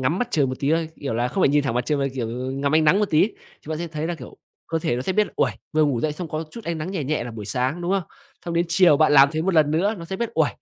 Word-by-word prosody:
ngắm 155 +8 0
mặt 245 - -1
trời 145 - +2
một 130 - -4
tí 140 +1 +1
thôi, 165 0 +1
kiểu 135 -5 -3
là, 120 +2 0
không 190 - -1
phải - - +5
nhìn 145 0 +2
thẳng 120 -4 -1
mặt 125 0 -1
trời 150 -2 +1
mà, 140 - 0
kiểu, 120 -4 -3 0.2
ngắm 140 +2 -1
ánh 155 0 +4
nắng 180 +7 +5
một 210 - 0
tí, 160 +8 +3 0.3
chúng 155 +1 -4
ta - - -5
sẽ 170 - -3
thấy 155 -1 -4
là, 175 - -2
kiểu, 160 - -11 0.3
cơ 165 - 0
thể 155 -7 -1
nó 125 - -3
sẽ 185 - -1
biết 210 +2 +2
là, - - -14
ôi, - - +2 0.2
vừa 155 0 +3
ngủ 135 -5 0
dậy 150 +2 0
xong 170 +2 -6
có 155 +1 -3
chút 230 +4 -10
ánh 170 -1 -3
nắng 155 +4 -4
nhẹ 180 -7 -3
nhẹ 150 -2 -1
là 120 - -6
buổi 110 -2 -7
sáng, 130 - -1
đúng 175 - -1
không? 195 -1 +1 0.4
Xong 170 - -4
đến 170 +1 +2
chiều 175 -3 +5
bạn 155 -1 +4
làm 140 -1 +8
thế 155 - -1
một 190 +1 0
lần 150 -2 +4
nữa 190 +8 +1
nó 170 - -7
sẽ 190 +3 -5
biết, 235 +2 -2
ôi, 160 -2 +3
155 Hz, 350 wpm, -23 LUFS, 140-170 Hz, 0.4 s, làm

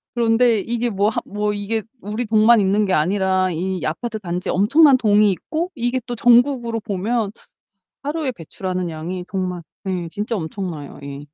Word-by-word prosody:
그런데 230 -1 +3
이게 235 +3 -1
뭐 200 0 +1
하 - - -2
뭐 210 +1 -1
이게 205 +2 -2 0.2
우리 215 +4 -3
동만 220 +1 +5
있는 200 +2 +2
게 190 - 0
아니라 185 +2 +2
이 180 +1 -3
아파트 220 +8 -3
단지에 180 -2 -3
엄청난 270 - +5
동이 210 -3 +4
있고 325 - -3
이게 245 0 -1
또 245 - -3
전국으로 240 -1 +3
보면 215 +1 -1 0.7
하루에 295 -1 -2
배출하는 185 -1 -4
양이 170 +3 -5
정말 185 -2 -2 0.2
네 185 -3 -3
진짜 210 +6 -3
엄청나요 160 -4 -5
예. 140 0 -7
205 Hz, 330 characters per minute, -21 LUFS, 185-235 Hz, 0.7 s, 동만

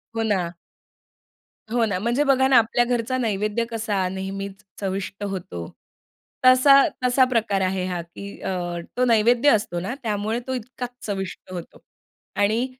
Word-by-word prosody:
हो 225 - 0
ना. 185 -5 0 1.2
हो 235 -1 +2
ना. 200 -4 -1
म्हणजे 240 +7 +1
बघा 265 -2 +4
ना 265 -2 +6
आपल्या 230 +2 +3
घरचा 245 +1 0
नैवेद्य 215 0 0
कसा 210 -5 -1
नेहमीच 195 +1 -5 0.2
चविष्ट 195 +1 -4
होतो. 175 - -5 0.8
तसा 275 +2 +8 0.2
तसा 250 +1 +4
प्रकार 220 -5 +1
आहे 185 0 0
हा 175 -2 -2
की 200 +4 -10
अ, - - -3 0.5
तो 250 - +3
नैवेद्य 235 +3 +4
असतो 205 -8 +1
ना 195 +8 -3
त्यामुळे 215 +1 -1
तो 260 - -2
इतकाच 250 0 -5 0.2
चविष्ट 195 -2 -5
होतो 175 -2 -8 0.6
आणि 220 +5 +2
215 Hz, 145 wpm, -23 LUFS, 195-245 Hz, 1.2 s, तसा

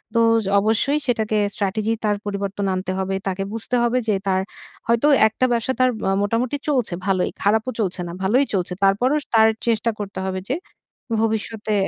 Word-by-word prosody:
তো, 230 - +4 0.3
য - - -3
অবশ্যই 225 +8 +1
সেটাকে 220 -3 +1 0.2
স্ট্র্যাটেজি 210 +2 -1
তার 210 -1 +1
পরিবর্তন 200 0 -3
আনতে 185 0 -3
হবে। 190 0 -1
তাকে 195 0 -1
বুঝতে 225 +2 -3
হবে 240 +1 +2
যে 210 - +3
তার 190 -1 +2 0.5
হয়তো 235 +5 +3 0.2
একটা 240 +4 0
ব্যবসা 235 +2 0
তার 255 - +5 0.2
আ - - +2
মোটামুটি 230 +6 0
চলছে 250 -9 0
ভালই, 190 -2 +1
খারাপও 220 +5 +2
চলছে 190 -2 -2
না, - - -6
ভালোই 245 +9 +3
চলছে। 180 -2 -1
তারপরও 245 +9 +3
স - - -28
তার 220 0 +7 0.2
চেষ্টা 230 0 +2
করতে 200 -2 -5
হবে 190 0 -3
যে, 265 - +1 0.7
ভবিষ্যতে 220 -1 -1
215 Hz, 175 wpm, -22 LUFS, 195-235 Hz, 0.7 s, তার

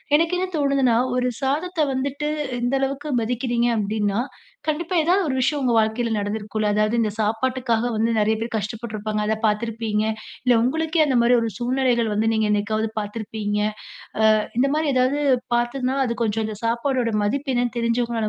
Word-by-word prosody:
எனக்கு 330 +3 +2
என்ன 370 +1 -1
தோணுதுன்னா, 275 -5 +2 0.2
1 250 0 +1
சாதத்த 315 +6 -1
வந்துட்டு, 280 +3 -2 0.3
இந்த 245 +2 0
அளவுக்கு 275 +2 -2
மதிக்கிறீங்க, 240 +1 0
அப்பிடீன்னா 210 0 0 0.5
கண்டிப்பா, 330 +4 -1
ஏதாவது 365 +5 +3
1 265 - -1
விஷயம், 280 +3 +1
உங்க 250 -3 +1
வாழ்க்கையில 225 +2 +1
நடந்திருக்கும்ல. 210 +1 -2
அதாவது, 215 +1 +2
இந்த 215 -2 0
சாப்பாட்டுக்காக 235 +2 0
வந்து, 225 +2 +1
நிறைய 215 +1 +2
பேர் 230 +1 -4
கஷ்டப்பட்டுருப்பாங்க. 215 0 -4
அத 220 +1 +1
பார்த்திருப்பீங்க, 215 0 -1 0.4
இல்ல 250 -1 +4
உங்களுக்கே 320 +5 +1
அந்தமாரி 245 -3 +3
1 230 - -1
சூழ்நிலைகள் 245 -2 +1
வந்து, 220 +2 +1
நீங்க 220 -1 +1
என்னைக்காவது 215 +2 0
பார்த்திருப்பீங்க 210 0 -3 0.8
அ - - +1 0.2
இந்தமாரி 285 +5 +2
ஏதாவது 255 +3 +2 0.4
பார்த்திருந்தாலும், 255 +3 0
அது 235 - -2
கொஞ்சம் 220 0 0
இந்த 215 -1 -5
சாப்பாடோட 235 +1 0
மதிப்பு 275 +7 -1
என்னன்னு 245 -1 0
தெரிஞ்சவங்கனால 235 -1 0
235 Hz, 150 wpm, -23 LUFS, 220-265 Hz, 0.8 s, இல்ல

